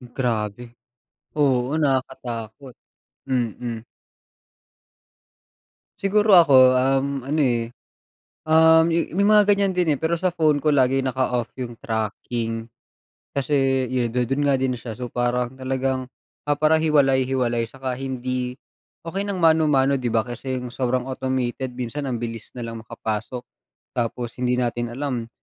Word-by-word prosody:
Grabe. 120 -1 -2 0.6
Oo, 135 -1 +2
nakakatakot. 130 -3 -3 0.5
Mm. 120 -2 -2 2.2
Siguro 205 0 +4
ako, 145 -6 +7 0.2
um, 135 +2 +2 0.2
ano, 150 +3 0
eh. 120 -3 0 0.7
Um, 160 +1 +5
may 170 +3 0
mga 210 0 +5
ganiyan 200 -1 +1
din, 170 -4 +3
eh, - - -2
pero 165 +1 +1
sa 185 - +1
phone 155 -4 +3
ko 145 - -3
lagi 135 -1 +3
naka-off 125 -2 0
'yung 120 -2 -6
tracking. 115 +1 -3 0.7
Kasi 135 -2 +1
yu 125 -2 0
do'n 125 +4 0
nga 140 - +3
din 130 -1 0
siya 115 -1 -7
so 125 +2 -6
parang 125 +1 -1
talagang 130 0 -2 0.4
ah, 145 - +2
para 155 +1 +4
hiwalay-hiwalay 130 -5 +2
tsaka 130 +1 -5
hindi 130 -1 -3 0.5
okey 190 +4 -2
ng 200 -2 -3
mano-mano 150 -4 +4
di 125 - -4
ba, 115 - +3
kasi 120 +3 -5
'yung 125 - -6
sobrang 125 +1 -1
automated 130 -1 -2
minsan 125 +4 -4
ang 120 -3 -3
bilis 115 -2 -6
nalang 115 -2 -6
makapasok. 110 +1 -4 0.5
Tapos 120 0 -3
hindi 125 0 +2
natin 120 -1 -2
alam, 130 -5 -3
130 Hz, 130 wpm, -23 LUFS, 120-145 Hz, 2.2 s, ako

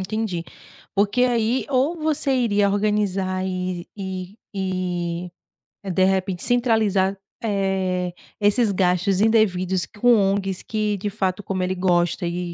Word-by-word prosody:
entendi, 190 -3 -2 0.5
porque, 205 +5 +2
aí, 240 0 +1
ou 270 +5 +2
você 310 -3 0
iria 205 -5 +2
organizar 200 -2 0
e 185 -1 -3
e 190 0 -6 0.2
e 180 -2 -2 0.5
é, 195 - -5
de 185 +1 +2
repente, 190 -1 0
centralizar, 220 -6 +2 0.3
eh, 190 -3 0 0.3
esses 210 +2 +3
gastos 185 0 +1
indevidos 190 -5 +2
com 240 +3 +3
ONGs 195 -2 0
que 215 -1 -1
de 205 +2 -3
fato, 195 -1 -1
como 185 -1 -2
ele 185 +1 -1
gosta, 175 -1 +1
eh, 175 0 -3
195 Hz, 130 wpm, -23 LUFS, 185-215 Hz, 0.5 s, esses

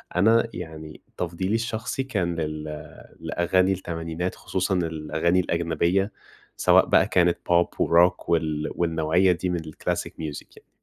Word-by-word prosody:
أنا 115 +5 +4
يعني 80 -3 -8 0.2
تفضيلي 90 +4 -2
الشخصي 115 +3 -2
كان 95 -10 -2
لل 75 -1 -3 0.6
لأغاني 95 +2 +1
التمانينات 85 -1 -4
خصوصًا 95 +1 -2
الأغاني 85 +1 0
الأجنبية، 85 +3 0 0.5
سواء - - +5
بقى - - +4
كانت 90 -1 +3
بوب 85 0 +4
وروك 85 +2 +3
وال 80 -3 0
والنوعية 85 +2 +2
دي 90 +1 -1
من 90 -1 -1
الclassic 80 -1 -3
music 75 -2 -6
يعني. - - -19
85 Hz, 125 wpm, -25 LUFS, 80-95 Hz, 0.6 s, سواء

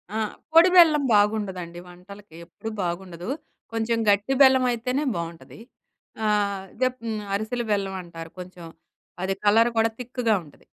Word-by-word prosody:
ఆ! - - 0 0.4
పొడి 335 +3 +8
బెల్లం 315 -5 +7
బాగుండదండి 190 -5 0
వంటలకి, 185 0 -14
ఎప్పుడూ 200 +6 -8
బాగుండదు. 175 +2 -5 0.4
కొంచెం 230 +1 0
గట్టి 205 +6 +2
బెల్లమయితేనే 255 0 +3
బావుంటది. 170 +4 -7 0.7
ఆహ్, 200 -2 0 0.2
దెప్ 255 0 +1
హ్మ్, 215 -2 -3
అరిసెల 220 +4 -2
బెల్లమంటారు 180 -5 -4
కొంచెం, 180 -1 -10 0.6
అది 195 0 -1
కలర్ 225 +3 +5
కూడా 225 0 +2
థిక్కుగా 245 -2 0
ఉంటది. 145 - -20
205 Hz, 120 wpm, -24 LUFS, 180-240 Hz, 0.7 s, పొడి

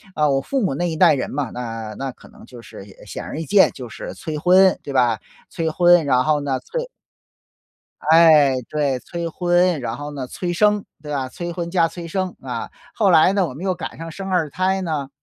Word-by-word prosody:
啊， 150 -1 +2
我 135 0 +1
父 270 - -2
母 185 -9 0
那 175 +4 -1
一 160 - -4
代 - - +6
人 130 - -2
嘛， 140 -4 -3
那 115 -3 -6
那 135 -1 -4
可 - - -18
能 - - -17
就 125 - -13
是 100 - -11 0.2
显 - - -7
而 155 - -6
易 165 - -4
见， 195 +5 +5
就 125 -3 -9
是 - - -8
催 155 -2 -5
婚， 185 +4 +5
对 140 - -6
吧？ 120 -4 +2 0.3
催 165 -1 -2
婚， 175 0 +5
然 125 -2 +3
后 150 -1 +2
呢， 135 -2 -2
催 - - -5 1.2
哎， 155 -5 +6
对， 145 -4 0
催 170 +3 -5
婚， 175 -2 +1
然 115 -1 -4
后 145 0 -6
呢， 135 -3 -5
催 175 +7 -4
生， 210 +2 +2 0.2
对 150 -1 -8
吧？ 135 -2 -2
催 175 +6 -6
婚 170 -1 -4
加 170 -2 +2
催 170 0 -8
生， 185 +1 -3
啊。 125 -3 -5 0.3
后 200 -4 +3
来 170 +3 +5
呢， 195 -3 +2
我 130 - -8
们 160 +7 -9
又 185 -1 0
赶 - - -7
上 165 0 -7
生 195 +4 -7
二 170 -5 +1
胎 190 +4 0
呢， 150 -6 -3
160 Hz, 235 characters per minute, -21 LUFS, 135-180 Hz, 1.2 s, 代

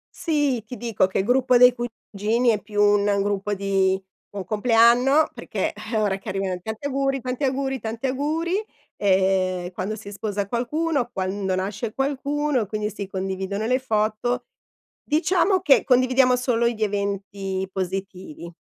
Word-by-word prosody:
Sì, 290 -7 0
ti 250 - -7
dico 230 -6 +1
che 190 - -1
il - - -1
gruppo 250 +2 +3
dei 250 0 +7
cugini 235 -1 -1
è 215 -2 +1
più 205 0 -1
un 205 -1 +3
gruppo 205 0 -1
di 195 -1 +1 0.3
buon 200 -2 -6
compleanno 235 - +4
perché, - - -3
eh 230 - -6
ora 205 -3 +1
che 195 - -12
arrivano: 190 -1 -2
"Tanti 220 +6 -6
auguri, 270 -1 -1
tanti 255 +3 -3
auguri, 270 0 -1
tanti 225 +4 -3
auguri!" 320 +9 -1 0.3
Ehm, 190 -2 +1
quando 195 +4 -4
si 205 -1 -10
sposa 205 -1 -3
qualcuno, 260 - -1
quando 190 -2 -2
nasce 205 +4 -3
qualcuno, 280 -2 -1
quindi 210 +1 -3
si 200 -1 -6
condividono 190 +2 -3
le 250 +3 +2
foto. 225 +1 -1 0.6
Diciamo 360 +5 +2
che 295 -7 +4
condividiamo 255 0 +4
solo 245 -2 +1
gli 225 -2 -4
eventi 200 -2 -2
positivi. 185 -3 -5
220 Hz, 150 wpm, -23 LUFS, 195-255 Hz, 0.6 s, dei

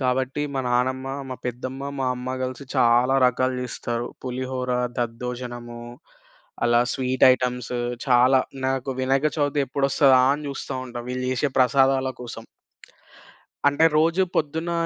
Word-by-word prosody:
కాబట్టి 130 +2 0
మా 135 - 0
నానమ్మ, 130 +2 0 0.2
మా 130 - -4
పెద్దమ్మ, 130 +2 -5 0.2
మా 130 - 0
అమ్మ 125 +1 -5
గలిసి 130 +2 -6
చాలా 125 +1 +4
రకాలు 130 +1 +1
జేస్తారు. 120 -1 -4 0.2
పులిహోర, 130 0 -3 0.3
దద్దోజనము 120 0 -5 0.8
అలా 120 0 +4
స్వీట్ 130 -1 +1
ఐటెమ్స్ 125 -1 -2 0.4
చాలా. 125 +1 +5 0.3
నాకు 135 0 -1
వినక 135 +3 +2
చవితి 145 0 +1
ఎప్పుడొస్తదా 135 0 +4
అని 150 +1 -4
జూస్తా 140 - -5
ఉంటా 120 -1 -6
వీళ్ళు 125 0 -3
జేసే 130 +3 0
ప్రసాదాల 130 +1 +3
కోసం. 120 - -8 1.2
అంటే 145 +3 +2
రోజు 165 +4 +3
పొద్దున 160 +3 -1
130 Hz, 125 wpm, -24 LUFS, 125-135 Hz, 1.2 s, చాలా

